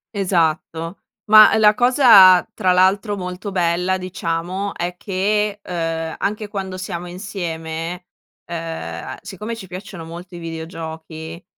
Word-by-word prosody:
Esatto. 165 Hz, -2 st, -1 dB, 0.3 s
Ma 215 Hz, 0 st, +9 dB
la 210 Hz, -1 st, +6 dB
cosa, 235 Hz, -7 st, +7 dB
tra 185 Hz, -, +1 dB
l'altro, 195 Hz, +3 st, +2 dB
molto 180 Hz, +2 st, -5 dB
bella 180 Hz, 0 st, +1 dB
diciamo, 185 Hz, +1 st, -3 dB
è 175 Hz, +1 st, -3 dB
che, 205 Hz, +2 st, -1 dB
uhm, 165 Hz, -2 st, -3 dB
anche 210 Hz, +1 st, -2 dB
quando 190 Hz, -3 st, -5 dB
siamo 180 Hz, -2 st, -5 dB
insieme, 175 Hz, -2 st, -5 dB, 0.4 s
uhm, 165 Hz, -, -6 dB
siccome 210 Hz, +5 st, -6 dB
ci 210 Hz, -4 st, -9 dB
piacciono 185 Hz, -1 st, -8 dB
molto 175 Hz, +2 st, -10 dB
i -, -, -7 dB
videogiochi, 160 Hz, 0 st, -7 dB
180 Hz, 120 wpm, -20 LUFS, 165-195 Hz, 0.4 s, Ma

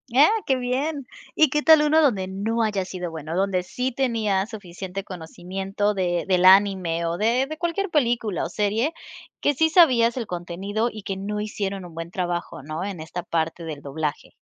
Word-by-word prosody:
Ah, 290 Hz, +3 st, +8 dB, 0.2 s
qué 265 Hz, -, +3 dB
bien, 265 Hz, +3 st, -2 dB, 0.3 s
¿y 310 Hz, -3 st, +5 dB
qué 300 Hz, -, +1 dB
tal 315 Hz, -1 st, +7 dB
uno 310 Hz, +2 st, +4 dB
donde 200 Hz, -10 st, +2 dB
no 220 Hz, +4 st, -1 dB
haya 205 Hz, -3 st, 0 dB
sido 180 Hz, -2 st, -5 dB
bueno?, 160 Hz, +1 st, -6 dB
donde 190 Hz, -1 st, +1 dB
sí 250 Hz, +8 st, -3 dB
tenías 225 Hz, -6 st, 0 dB
suficiente 190 Hz, -2 st, -7 dB
conocimiento 190 Hz, +3 st, -3 dB
de 175 Hz, -3 st, -1 dB
del 185 Hz, -1 st, +3 dB
anime 185 Hz, -4 st, +5 dB
o 170 Hz, +1 st, -1 dB
de 235 Hz, +5 st, +2 dB
de 310 Hz, +1 st, -6 dB
cualquier 350 Hz, +3 st, -1 dB
película 235 Hz, -, +1 dB
o -, -, -3 dB
serie, 215 Hz, -, 0 dB, 0.5 s
que 290 Hz, -, +2 dB
sí 320 Hz, +4 st, +2 dB
sabías 255 Hz, -9 st, +5 dB
el 235 Hz, -, -2 dB
contenido 195 Hz, +6 st, -3 dB
y 215 Hz, -2 st, -9 dB
que 195 Hz, -2 st, -3 dB
no 205 Hz, +2 st, -4 dB
hicieron 200 Hz, -3 st, -4 dB
un 170 Hz, -, -11 dB
buen 165 Hz, +1 st, -6 dB
trabajo, 175 Hz, -6 st, -3 dB
¿no?, 155 Hz, +4 st, -4 dB
en 195 Hz, -5 st, -5 dB
esta 175 Hz, +3 st, -5 dB
parte 165 Hz, 0 st, -2 dB
del 150 Hz, -3 st, -6 dB
doblaje. 150 Hz, +1 st, -4 dB
200 Hz, 185 wpm, -24 LUFS, 175-245 Hz, 0.5 s, Ah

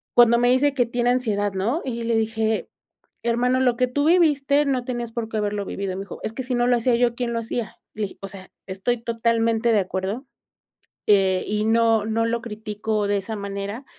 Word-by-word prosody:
Cuando 235 Hz, -1 st, +6 dB
me 245 Hz, 0 st, +3 dB
dice 265 Hz, +3 st, +3 dB
que 250 Hz, -3 st, +2 dB
tiene 240 Hz, +1 st, +1 dB
ansiedad, 205 Hz, -5 st, 0 dB
¿no? 225 Hz, -, -1 dB
y 235 Hz, -3 st, -3 dB
le 230 Hz, 0 st, 0 dB
dije: 220 Hz, 0 st, 0 dB, 0.5 s
"Hermano, 245 Hz, +2 st, +1 dB
lo 250 Hz, -2 st, +3 dB
que 250 Hz, -, +2 dB
tú 285 Hz, +4 st, -1 dB
viviste 295 Hz, -4 st, +3 dB
no 260 Hz, -3 st, 0 dB
tenías 240 Hz, -2 st, -4 dB
por 230 Hz, -1 st, -4 dB
qué 225 Hz, -, -3 dB
haberlo 205 Hz, -1 st, -1 dB
vivido", 195 Hz, -1 st, -4 dB
me 195 Hz, -, -4 dB
dijo: 195 Hz, -, -9 dB
"Es 220 Hz, -, -3 dB
que 260 Hz, -, -4 dB
si 255 Hz, 0 st, -2 dB
no 240 Hz, 0 st, +2 dB
lo 245 Hz, -, +4 dB
hacía 235 Hz, +1 st, +2 dB
yo, 235 Hz, 0 st, +2 dB
¿quién 235 Hz, -1 st, -2 dB
lo 230 Hz, -, 0 dB
hacía?" 230 Hz, 0 st, -4 dB, 0.2 s
Le 215 Hz, -, -3 dB
dije: 200 Hz, -, -5 dB
"O 195 Hz, -, -5 dB
sea, 190 Hz, -1 st, -11 dB, 0.2 s
estoy 195 Hz, +6 st, -1 dB
totalmente 230 Hz, 0 st, +1 dB
de 215 Hz, -, +4 dB
acuerdo", 190 Hz, +6 st, -3 dB, 0.8 s
eh, 190 Hz, -3 st, +4 dB
y 210 Hz, +1 st, 0 dB
no 225 Hz, -1 st, +3 dB
no 225 Hz, +1 st, 0 dB
lo 230 Hz, 0 st, -1 dB
critico 215 Hz, -1 st, -3 dB
de 205 Hz, 0 st, +1 dB
esa 200 Hz, +3 st, -4 dB
manera, 200 Hz, +4 st, -5 dB
230 Hz, 215 wpm, -23 LUFS, 210-245 Hz, 0.8 s, Cuando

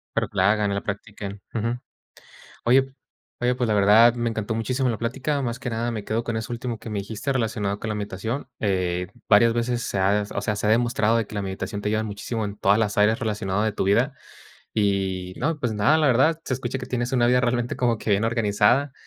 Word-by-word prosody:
Pero -, -, +1 dB
que -, -, -16 dB
la 95 Hz, +2 st, +4 dB
hagan 105 Hz, -2 st, 0 dB
y -, -, -1 dB
la 100 Hz, -, -2 dB
practiquen. 100 Hz, -1 st, -6 dB
Ujú. 115 Hz, +2 st, -1 dB, 0.9 s
Oye 130 Hz, +3 st, +5 dB
p 135 Hz, 0 st, -11 dB, 0.5 s
oye, 125 Hz, -, +3 dB
pues 125 Hz, -1 st, 0 dB
la 110 Hz, -, +2 dB
verdad, 105 Hz, +4 st, +6 dB
me 120 Hz, -1 st, -1 dB
encantó 110 Hz, 0 st, -3 dB
muchísimo 125 Hz, +4 st, 0 dB
la 115 Hz, -, 0 dB
plática. 135 Hz, +6 st, -2 dB
Más 120 Hz, -1 st, -3 dB
que 125 Hz, -, -5 dB
nada, 115 Hz, +1 st, -1 dB
me 110 Hz, -3 st, -4 dB
quedo 115 Hz, +2 st, -1 dB
con 115 Hz, -1 st, -2 dB
eso 110 Hz, +2 st, -4 dB
último 120 Hz, -1 st, -4 dB
que 115 Hz, -, -9 dB
me 105 Hz, -2 st, -2 dB
dijiste 110 Hz, +7 st, -3 dB
relacionado 105 Hz, -5 st, -1 dB
con 110 Hz, -, -5 dB
la 105 Hz, -, -1 dB
meditación. 105 Hz, +6 st, -4 dB
Eh, 90 Hz, -3 st, 0 dB, 0.2 s
varias 115 Hz, +2 st, +6 dB
veces 120 Hz, +1 st, -1 dB
se 100 Hz, -, -2 dB
ha 100 Hz, +2 st, +2 dB
o -, -, -1 dB
sea, 105 Hz, -, -1 dB
se 105 Hz, -, -2 dB
ha -, -, +3 dB
demostrado 115 Hz, -1 st, +2 dB
de 115 Hz, -2 st, 0 dB
que 105 Hz, -, -11 dB
la 100 Hz, -, -2 dB
meditación 95 Hz, +1 st, -4 dB
te 105 Hz, -, -1 dB
ayuda 110 Hz, +1 st, 0 dB
muchísimo 110 Hz, +2 st, -4 dB
en 100 Hz, 0 st, -5 dB
todas 100 Hz, +1 st, +3 dB
las 105 Hz, -2 st, 0 dB
áreas 105 Hz, +2 st, +4 dB
relacionado 105 Hz, -4 st, -1 dB
de 110 Hz, -1 st, 0 dB
tu -, -, -2 dB
vida. 120 Hz, +8 st, +2 dB, 0.6 s
Y 95 Hz, -3 st, 0 dB
no, 150 Hz, +3 st, -1 dB
pues 120 Hz, -4 st, -1 dB
nada, 105 Hz, +9 st, +3 dB
la 155 Hz, -2 st, +3 dB
verdad, 135 Hz, +6 st, +3 dB
se -, -, -1 dB
escucha 125 Hz, +1 st, -3 dB
que 130 Hz, -, -6 dB
tienes 120 Hz, 0 st, -2 dB
una 125 Hz, -2 st, +3 dB
vida, 125 Hz, +1 st, +4 dB
realmente 120 Hz, -1 st, 0 dB
como 120 Hz, -2 st, +1 dB
que 105 Hz, -, -2 dB
bien 100 Hz, +2 st, +2 dB
organizada. 115 Hz, +4 st, +2 dB
110 Hz, 240 wpm, -24 LUFS, 105-120 Hz, 0.9 s, verdad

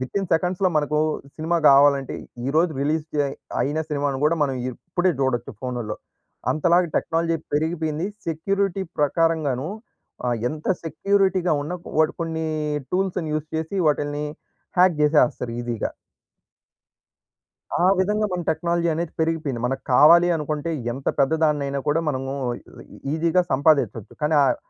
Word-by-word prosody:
With 130 Hz, +9 st, -5 dB
in 195 Hz, -, -3 dB
సెకండ్స్‌లో 180 Hz, +3 st, +1 dB
మనకు 150 Hz, 0 st, +1 dB, 0.4 s
cinema 165 Hz, +2 st, 0 dB
గావాలంటే, 140 Hz, -1 st, +5 dB, 0.3 s
ఈరోజు 160 Hz, +4 st, +2 dB
రిలీజ్ 150 Hz, +2 st, 0 dB
డే 145 Hz, -, +2 dB, 0.4 s
అయిన 150 Hz, +3 st, -1 dB
సినిమాను 140 Hz, -2 st, -1 dB
గూడా, 165 Hz, +2 st, +3 dB
మనం 135 Hz, -2 st, -2 dB, 0.2 s
ఇప్పుడే 175 Hz, +7 st, -1 dB
చూడొచ్చు 120 Hz, -3 st, 0 dB
ఫోనుల్లో. 120 Hz, -4 st, -3 dB, 0.6 s
అంతలాగా 170 Hz, +4 st, +3 dB
టెక్నాలజీ 165 Hz, 0 st, 0 dB, 0.2 s
పెరిగిపోయింది, 160 Hz, +2 st, -1 dB, 0.2 s
సెక్యూరిటీ 195 Hz, +4 st, -1 dB
ప్రకారంగాను 150 Hz, -2 st, +1 dB, 0.6 s
ఆహ్, 120 Hz, -1 st, +1 dB
ఎంత 155 Hz, +2 st, -7 dB, 0.2 s
సెక్యూరిటీగా 190 Hz, +2 st, +1 dB
ఉన్న, 150 Hz, -, -5 dB, 0.3 s
వాడు 155 Hz, -, +4 dB
కొన్ని 160 Hz, -1 st, -2 dB, 0.5 s
టూల్స్‌ని 185 Hz, -3 st, 0 dB
యూజ్ 155 Hz, 0 st, -2 dB
చేసి, 160 Hz, +5 st, -3 dB
వాటిల్ని 145 Hz, 0 st, 0 dB, 0.5 s
హ్యాక్ 180 Hz, -1 st, +6 dB
జేసేస్తారు 150 Hz, -5 st, +2 dB
ఈజీగా. 120 Hz, -2 st, -3 dB, 1.9 s
ఆ! -, -, +3 dB, 0.2 s
విధంగా 210 Hz, +3 st, +1 dB
మన 180 Hz, -, -1 dB
టెక్నాలజీ 170 Hz, +1 st, 0 dB
అనేది 165 Hz, 0 st, -3 dB
పెరిగిపోయింది. 160 Hz, -7 st, -1 dB
మనకు 135 Hz, +1 st, -3 dB
కావాలి 170 Hz, +6 st, +7 dB
అనుకుంటే, 150 Hz, +1 st, -3 dB, 0.2 s
ఎంత 135 Hz, +2 st, -9 dB
పెద్దదాన్నయినా 145 Hz, -1 st, +1 dB
కూడా 150 Hz, +3 st, +2 dB
మనము 135 Hz, -1 st, -2 dB, 0.6 s
ఈ -, -, -13 dB
ఈజీగా 170 Hz, +3 st, +2 dB
సంపాదించొచ్చు. 140 Hz, -6 st, +2 dB
కానీ 150 Hz, +1 st, +2 dB
ఆహ్, 135 Hz, -, +3 dB
155 Hz, 125 wpm, -23 LUFS, 140-170 Hz, 1.9 s, కావాలి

